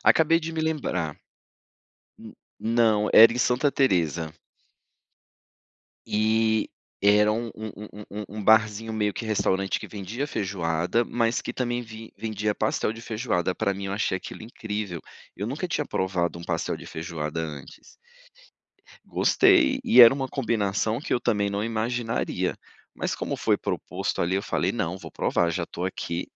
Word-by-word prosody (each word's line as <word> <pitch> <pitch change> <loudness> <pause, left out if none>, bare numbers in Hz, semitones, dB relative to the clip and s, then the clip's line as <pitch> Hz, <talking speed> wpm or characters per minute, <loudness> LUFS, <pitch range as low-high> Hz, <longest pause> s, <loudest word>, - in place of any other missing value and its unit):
Acabei 165 +1 +5
de 165 0 -5
me 160 - -2
lembrar. 135 - -2 1.0
Hum - - -11 0.3
não, 110 -2 +3
era 115 +1 +9
em 120 - -4
Santa 130 +3 +2
Teresa. 85 - +1 1.7
E 110 +1 +1 0.3
era 105 +1 +5
um 115 +2 -2
um 110 0 -6 0.4
um 105 +1 -6
um 105 - -4
barzinho, 110 +1 +3
meio 105 -2 0
que 115 - -5
restaurante, 100 -3 0
que - - -8
vendia 105 +7 -4
feijoada, 95 - -1
mas 115 +1 0
que, - - -5
também 120 -1 -1
ven 110 -1 -10
vendia 105 -1 -2
pastel 110 0 0
de 115 +1 -9
feijoada, 105 -6 -1
pra 100 - 0
mim, 100 +1 -6
eu 95 - -3
achei 100 -2 0
aquilo - - -9
incrível. 105 -6 -5 0.3
Eu 100 - -4
nunca 150 +9 -3
tinha 150 -3 -1
provado, 90 -5 -1
um - - -9
pastel - - -2
de - - -10
feijoada 80 -1 -4
antes. 75 -4 -9 1.1
Gostei, 340 -8 +4
e 225 - +7
era 120 +1 +10
uma 135 -1 -2
combinação, 110 -3 -1
que 145 - -3
eu - - +2
também 105 -4 +1
não 100 +1 -2
imaginaria. 115 +1 -1 0.4
Mas - - -2
como - - -3
foi - - +2
proposto, - - -3
ali, 85 +2 +1
eu 100 - 0
falei: - - 0
"Não, 95 -6 -2
vou - - -10
provar 85 - +1
já 85 +1 -2
estou 85 +1 -5
aqui." 90 -2 -4
110 Hz, 155 wpm, -26 LUFS, 95-120 Hz, 1.7 s, era